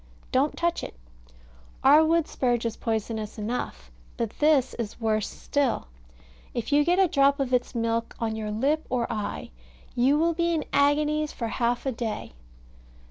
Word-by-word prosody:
Don't 275 Hz, +4 st, +1 dB
touch 340 Hz, 0 st, 0 dB
it. -, -, -7 dB, 0.9 s
Our 295 Hz, +4 st, +7 dB
wood 330 Hz, 0 st, +2 dB
spurge 240 Hz, -2 st, 0 dB
is 230 Hz, -, -1 dB
poisonous 220 Hz, -1 st, -3 dB
enough, 210 Hz, -, -4 dB, 0.3 s
but 230 Hz, -2 st, -2 dB
this 295 Hz, -4 st, +3 dB
is 220 Hz, -1 st, -4 dB
worse 215 Hz, -2 st, 0 dB
still; 270 Hz, -, -1 dB, 0.7 s
if 235 Hz, +3 st, -3 dB
you 295 Hz, +1 st, +5 dB
get 350 Hz, +4 st, +2 dB
a 385 Hz, -1 st, +5 dB
drop 280 Hz, -2 st, +3 dB
of 260 Hz, -2 st, -1 dB
its 250 Hz, 0 st, 0 dB
milk 230 Hz, 0 st, -1 dB
on 225 Hz, -2 st, -1 dB
your 215 Hz, -1 st, -4 dB
lip 275 Hz, +9 st, 0 dB
or 245 Hz, -2 st, 0 dB
eye, 210 Hz, -2 st, -4 dB, 0.4 s
you 260 Hz, +4 st, +3 dB
will 335 Hz, +2 st, +2 dB
be 340 Hz, 0 st, +1 dB
in 310 Hz, -, -2 dB
agonies 300 Hz, +1 st, +2 dB
for 230 Hz, -2 st, -3 dB
half 240 Hz, +2 st, -1 dB
a 265 Hz, -, +1 dB
day. 225 Hz, -, -4 dB
250 Hz, 165 wpm, -26 LUFS, 225-295 Hz, 0.9 s, Our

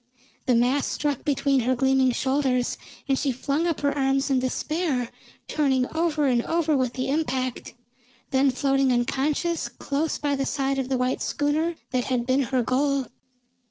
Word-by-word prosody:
The 250 Hz, -, +4 dB
mass 250 Hz, +4 st, +2 dB
struck 290 Hz, -3 st, -2 dB
between 280 Hz, -1 st, +2 dB
her 255 Hz, +1 st, +1 dB
gleaming 265 Hz, 0 st, +3 dB
shoulders, 260 Hz, -1 st, 0 dB, 0.3 s
and 270 Hz, -1 st, +1 dB
she 280 Hz, -, 0 dB
flung 280 Hz, +6 st, -1 dB
up 335 Hz, -, -1 dB
her 285 Hz, 0 st, +1 dB
arms 270 Hz, 0 st, +1 dB
in 265 Hz, -, +3 dB
despair, 260 Hz, 0 st, -1 dB, 0.4 s
turning 265 Hz, -4 st, +1 dB
over 320 Hz, -3 st, +1 dB
and 245 Hz, -3 st, +3 dB
over 325 Hz, -2 st, +1 dB
with 255 Hz, -3 st, 0 dB
the 255 Hz, -, -2 dB
impact, 260 Hz, -4 st, -2 dB, 0.6 s
then 270 Hz, 0 st, +4 dB
floating 270 Hz, 0 st, +2 dB
unconscious 285 Hz, +7 st, 0 dB
close 295 Hz, +3 st, -2 dB
by 285 Hz, -1 st, 0 dB
the 270 Hz, 0 st, -1 dB
side 270 Hz, -1 st, -1 dB
of 260 Hz, -1 st, -3 dB
the 265 Hz, -, +1 dB
white 250 Hz, +1 st, -1 dB
schooner 310 Hz, +4 st, 0 dB, 0.2 s
that 255 Hz, -2 st, 0 dB
had 250 Hz, -2 st, -1 dB
been 260 Hz, +2 st, +2 dB
her 255 Hz, -2 st, +1 dB
goal. 275 Hz, +2 st, 0 dB
270 Hz, 165 wpm, -25 LUFS, 255-290 Hz, 0.6 s, The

